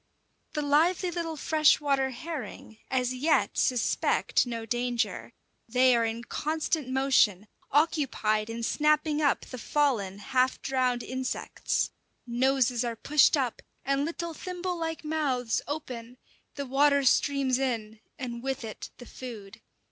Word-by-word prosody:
The 300 - -1
lively 335 +5 +2
little 330 -2 -3
freshwater 290 -3 +3
herring 265 -5 -7
as 255 -1 0
yet 285 +6 +1
suspect 250 0 +1
no 230 -2 -4
danger; 240 +1 -2 0.4
they 250 +1 +5
are 230 -1 +2
in 225 +1 -3
constant 310 +1 -2
motion, 255 -7 +3 0.2
occupied 265 -8 +1
in 230 +1 -5
snapping 300 +3 +2
up 285 -2 +2
the 255 - -9
fallen, 230 -10 0
half 255 +5 +1
drowned 255 -2 0
insects. 260 0 -2 0.3
Noses 250 0 +1
are 235 -1 -2
pushed 295 +6 +4
up, 255 -4 -1 0.2
and 275 +1 +1
little 335 +1 -4
thimble 360 +2 -4
like 325 -2 -4
mouths 275 -7 0
open; 250 -5 -6 0.4
the 280 - -4
water 280 +2 +3
streams 265 0 +2
in, 225 -5 -2 0.2
and 240 -4 -5
with 270 0 -3
it 220 -1 -7
the 245 - -11
food. 225 -4 -9
260 Hz, 130 wpm, -28 LUFS, 240-300 Hz, 0.4 s, they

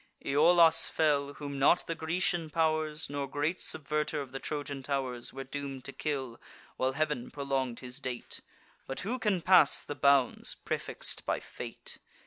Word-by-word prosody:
Iolas 165 +4 +6
fell, 145 -2 +1
whom 140 -2 -6
not 145 +6 +4
the 165 - -2
Grecian 165 0 -1
pow'rs, 155 -1 0
Nor 140 -1 -3
great 145 +6 -1
subverter 150 0 -1
of 135 -3 -6
the 135 - -5
Trojan 145 -1 -4
tow'rs, 130 -3 -2
Were 135 - -6
doom'd 135 -1 -6
to - - -4
kill, 135 -6 -4 0.3
while 130 +1 0
Heav'n 150 -4 -1
prolong'd 135 -4 -2
his 125 -1 -7
date; 125 -2 -6 0.5
But 135 - -4
who 235 +7 -3
can 205 -6 0
pass 180 -6 +6
the - - -5
bounds, 140 -2 +3
prefix'd - - -3
by - - +1
fate? - - -8
145 Hz, 155 wpm, -30 LUFS, 135-155 Hz, 0.5 s, Iolas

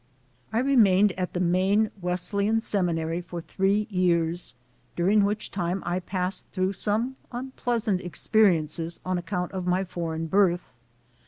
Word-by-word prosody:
I - - -1
remained 210 -7 +4
at 185 -1 -4
the 180 - -2
Maine 190 +5 +2
Wesleyan 200 +5 0
Seminary 170 -5 -1
for 175 0 -7
three 195 +5 0
years, 175 -4 0 0.4
during 200 +4 +3
which 205 +2 -2
time 180 0 -2
I 175 +1 0
passed 185 0 -3
through 185 0 -1
some 220 +7 -1
unpleasant 240 -5 -2
experiences 170 -4 +1
on 185 -1 0
account 180 0 -3
of 185 -2 -4
my 180 +2 +2
foreign 165 -3 -4
birth. 180 0 +2
185 Hz, 135 wpm, -26 LUFS, 175-205 Hz, 0.4 s, remained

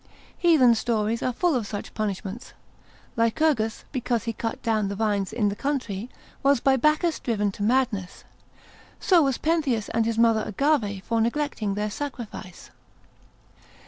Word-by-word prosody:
Heathen 305 -9 +5
stories 225 -1 0
are 255 - 0
full 345 +7 +1
of 235 -6 -1
such 205 -1 -6
punishments. 205 +1 -4 0.6
Lycurgus, 230 -1 +1
because 245 -4 -1
he 230 - -3
cut 225 +1 -4
down 220 -3 +1
the 200 - -3
vines 205 -2 0
in 210 -4 +1
the 200 - -4
country, 250 -5 -3 0.3
was 275 -2 +4
by 270 +2 +3
Bacchus 305 +5 +2
driven 210 -4 0
into 200 - -8
madness: 220 -5 0 0.8
so 360 -3 +4
was 270 -4 +1
Pentheus 290 -9 0
and 225 0 +1
his 230 -1 -1
mother 230 -1 +4
Agave 215 -4 0
for 225 +5 0
neglecting 235 -4 -1
their 210 0 -2
sacrifice. 235 -9 -7
230 Hz, 145 wpm, -25 LUFS, 210-270 Hz, 0.8 s, Heathen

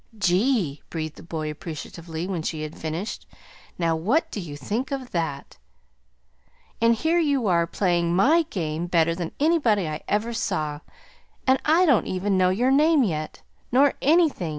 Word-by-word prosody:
"Gee!" 195 - +1
breathed 155 -2 -5
the - - -11
boy 160 -2 -4
appreciatively, 160 +2 -7
when 185 -4 -3
she 155 -1 -3
had 155 0 -6
finished. 160 +6 -5 0.5
"Now 165 -2 +1
what 220 - 0
do - - -4
you 155 -6 -7
think 215 - -3
of 265 -3 -4
that!" 160 -5 -4 1.2
"And 230 0 +4
here 325 +7 +1
you 285 -7 +1
are, 170 -3 +2
playing 175 -2 0
MY 305 - +4
game 165 -2 -3
better 165 -1 +2
than 170 -1 -4
anybody 275 - +2
I 155 0 -4
ever 220 +3 0
saw, 150 -9 -2 0.7
and 260 0 +3
I 330 +4 +4
don't 275 - +3
even 190 +2 -1
know 185 -1 +3
your 240 +8 +2
name 300 +1 +4
yet, 155 -7 -3 0.3
nor 275 +3 +4
anything!" 305 - +3
185 Hz, 160 wpm, -24 LUFS, 165-260 Hz, 1.2 s, And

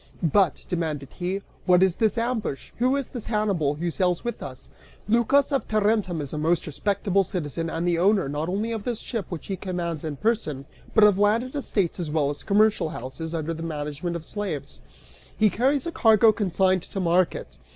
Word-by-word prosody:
"But," 170 0 +2
demanded 155 -5 -2
he, 190 +2 -3 0.2
"what 180 0 +6
is 190 -2 +2
this 220 0 +2
ambush? 230 - -2
Who 255 +3 +3
is 275 -2 -2
this 240 -4 -6
Hannibal 200 -10 +1
who 170 +3 -2
sails 180 -1 0
with 240 - -4
us? - - -8 0.4
Lycas 235 +6 +3
of 275 - 0
Tarentum 210 -5 +1
is 140 - -6
a 150 - -2
most 165 +2 +1
respectable 195 +4 0
citizen 165 -2 -3
and 165 +2 -2
the 170 -1 +2
owner, 195 -3 +3
not 150 +4 -2
only 210 +5 -1
of 220 -3 -3
this 235 -1 -2
ship, 220 -7 -4
which 175 -4 -6
he 195 - -3
commands 175 -4 -4
in 155 -2 -3
person, 155 - -1 0.3
but 220 - +6
of 205 -2 +6
landed 225 +5 +2
estates 200 - -1
as 170 -3 -3
well 150 -2 +1
as 145 - -7
commercial 205 -4 +3
houses 160 +4 -6
under 160 0 -2
the 165 - -7
management 155 +1 -4
of 165 -1 -6
slaves. 200 -9 -5 0.6
He 215 -2 +4
carries 265 +7 +1
a 335 - -2
cargo 225 -5 +5
consigned 190 -3 +1
to 195 - -6
market. 170 - 0
185 Hz, 195 wpm, -25 LUFS, 160-215 Hz, 0.6 s, what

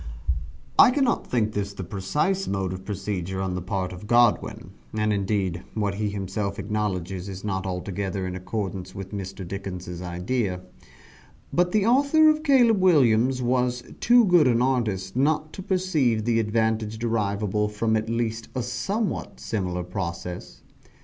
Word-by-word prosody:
I - - +10
cannot 255 -2 +1
think 110 -3 +1
this 100 -1 -2
the 95 - -6
precise 145 - -1
mode 95 -2 -1
of 95 0 -8
procedure 95 -2 -3
on 95 -1 -1
the 90 - -3
part 90 0 -2
of 90 +4 -9
Godwin 120 +1 +2 0.2
and 110 0 +1
indeed 95 -3 -1
what 105 -2 0
he 105 +1 -1
himself 100 0 -3
acknowledges, 100 -3 -2
is 95 -1 -7
not 95 -2 -2
altogether 95 +1 -3
in 90 0 -4
accordance 95 -1 -4
with 95 -1 -7
Mr. 95 -2 -6
Dickens' 90 -2 -6
idea 90 +2 -2 0.9
but 175 +1 +2
the 210 -1 +2
author 280 +6 +5
of 305 0 -2
"Caleb 245 -9 +4
Williams" 130 -7 +4
was 125 0 +1 0.2
too 240 0 +6
good 175 -6 +5
an 120 -2 +3
artist 110 -7 0
not 155 +3 +1
to - - -6
perceive 155 - +1
the 115 -1 +2
advantage 110 0 0
derivable 105 -2 0
from 110 +1 0
at 110 +1 -1
least 115 -1 -2
a 125 - -1
somewhat 190 - -2
similar 90 -5 -2
process. 90 -1 -6
105 Hz, 150 wpm, -25 LUFS, 95-125 Hz, 0.9 s, I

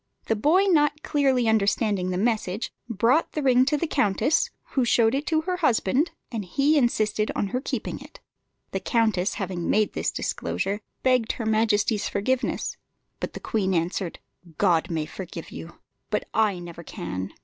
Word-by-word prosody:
The 225 - +1
boy 310 - +4
not 300 -5 +2
clearly 270 -5 +2
understanding 205 -3 +2
the 180 - -1
message, 215 -1 -1 0.2
brought 235 - +2
the 300 - -2
ring 255 -1 +5
to 295 +2 +1
the 315 - -1
countess, 260 +1 +2 0.2
who 265 - +2
showed 230 -1 +3
it 280 +2 -1
to 315 -2 +2
her 360 +2 -2
husband, 285 - +2 0.2
and 225 -4 -3
he 275 - +2
insisted 215 -5 +1
on 200 - -1
her 250 +3 -2
keeping - - -4
it. - - -13 0.5
The - - -1
countess, 220 -6 +1
having 180 -3 -3
made 215 -1 +2
this - - -1
disclosure, 140 - -2 0.2
begged 255 -3 +2
her 230 - -5
majesty's 215 -1 +2
forgiveness; 255 +6 -1 0.4
but - - -4
the - - -6
queen 190 -5 0
answered, 170 +1 -1 0.4
"God 175 -3 +2
may 160 -3 -1
forgive 170 +1 -8
you, 165 - -9 0.3
but 210 - 0
I 215 -4 +2
never 170 -1 -8
can!" 95 - -5
220 Hz, 165 wpm, -25 LUFS, 190-260 Hz, 0.5 s, ring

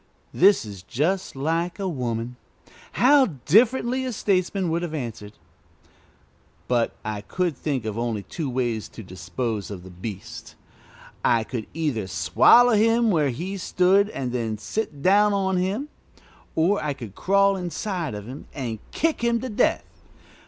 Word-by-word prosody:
This 195 - +5
is 100 -4 -9
just 155 - -1
like 165 +5 -1
a 195 -2 -2
woman. 125 -6 -3 0.6
How 270 +2 +5 0.2
differently 245 - +3
a 255 - -2
statesman 190 -4 0
would 170 +1 0
have 170 -2 -4
answered! 110 -6 -6 1.3
But 120 -2 +1
I 105 -1 -3
could 175 - -2
think 135 -4 -3
of 110 +1 -3
only 115 -4 -2
two 155 - -4
ways 120 -4 -2
to 110 - -10
dispose 95 +4 -4
of 95 -4 -7
the 95 - -11
beast. 95 +2 -8 0.7
I 115 -1 +3
could 110 -1 -5
either 140 -11 -1
swallow 95 - +5
him 225 +1 +3
where 155 -6 +2
he 180 +11 -4
stood 190 +2 +3
and 130 - -4
then 115 -3 -2
sit 145 - -4
down 205 +2 +5
on 190 -1 +1
him, 200 +11 -1 0.7
or 170 +2 +2
I 150 -1 -1
could 120 -8 -9
crawl 195 - +3
inside 180 - -3
of 105 -1 -7
him 130 +5 -9
and 120 -6 -4
kick 320 -6 0
him 235 0 +2
to 260 - -4
death. 210 - +1
155 Hz, 150 wpm, -24 LUFS, -, 1.3 s, This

